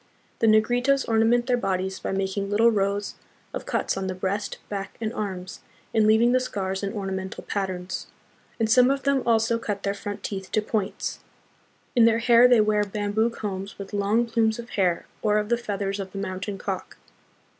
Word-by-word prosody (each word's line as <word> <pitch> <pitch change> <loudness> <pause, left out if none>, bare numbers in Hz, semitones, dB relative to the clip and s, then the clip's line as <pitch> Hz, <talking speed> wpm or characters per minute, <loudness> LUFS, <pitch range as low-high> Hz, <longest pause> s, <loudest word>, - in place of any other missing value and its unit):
The 225 - +3
Negritos 245 +5 +3
ornament 230 +2 +3
their 250 -1 +2
bodies 190 -3 -2
by - - -3
making 195 +1 -2
little 225 +3 +4
rows 200 -1 0 0.4
of - - -5
cuts - - 0
on 190 0 -3
the 185 - -3
breast, 195 +3 -2
back, 195 -1 -5
and 225 0 -3
arms, 190 -2 -5 0.3
and 220 -1 +4
leaving 225 +3 +5
the 255 - +4
scars 195 -6 -3
in 200 -1 -2
ornamental 190 -2 -4
patterns; 185 -3 -3 0.5
and 225 - +2
some 250 +3 +5
of 275 -1 0
them 280 -1 +2
also 230 0 +3
cut 205 -3 -4
their 200 - 0
front 205 0 -6
teeth 190 -2 -5
to 215 - +3
points. 210 -2 -2 0.8
In 235 -2 +6
their 230 0 +4
hair 235 +1 +6
they 245 -3 +6
wear 210 0 +2
bamboo 205 +2 0
combs 200 -3 -5
with 200 +1 -8
long 205 +4 +2
plumes 225 -1 +1
of 235 0 -8
hair 180 -4 +1 0.2
or 210 -1 +2
of 210 0 -1
the 240 - +4
feathers 200 -3 -3
of 190 -1 -6
the - - -6
mountain 190 +1 -4
cock. 190 -1 -5
210 Hz, 190 wpm, -25 LUFS, 195-230 Hz, 0.8 s, In